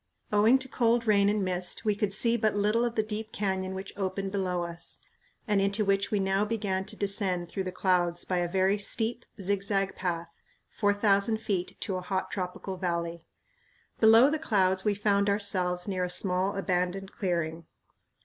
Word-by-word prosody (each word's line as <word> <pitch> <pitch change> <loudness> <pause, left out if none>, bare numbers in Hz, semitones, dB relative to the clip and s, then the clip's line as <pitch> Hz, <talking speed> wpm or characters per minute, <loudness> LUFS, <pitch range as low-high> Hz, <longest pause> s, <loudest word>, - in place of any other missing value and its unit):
Owing 215 +5 +5
to 265 0 -5
cold 235 -2 +1
rain 200 -2 +4
and 205 -2 0
mist 180 +3 -3
we 210 -1 +2
could 205 -1 -1
see 230 +3 +3
but 215 -2 +1
little 210 +3 +2
of 240 -1 -1
the 220 - +2
deep 215 +1 -5
canyon 190 -2 -2
which 190 +1 -7
opened 195 0 -3
below 185 -3 -1
us, 170 0 -1 0.5
and 205 -2 +2
into 200 +2 +1
which 195 0 +1
we 210 - 0
now 195 +1 +1
began 205 -3 -2
to - - -5
descend 195 -4 0
through 190 +2 -4
the 185 - -3
clouds 175 -2 +1
by 180 -1 0
a 175 - 0
very 190 +2 +2
steep, 230 +3 -1
zigzag 195 0 0
path, 170 -2 -3 0.4
four 205 -2 +1
thousand 205 +1 +2
feet 190 -5 -3
to 190 -4 -2
a - - -4
hot 190 +1 -3
tropical 185 0 -4
valley. 170 -2 -3 0.7
Below 225 +5 +7
the 310 - -1
clouds 190 -10 +1
we 210 -1 +1
found 200 0 +1
ourselves 185 -3 +1
near 185 -2 -1
a 180 - -2
small 185 +2 +1
abandoned 190 0 -1
clearing. 170 -3 -3
195 Hz, 180 wpm, -28 LUFS, 185-210 Hz, 0.7 s, Below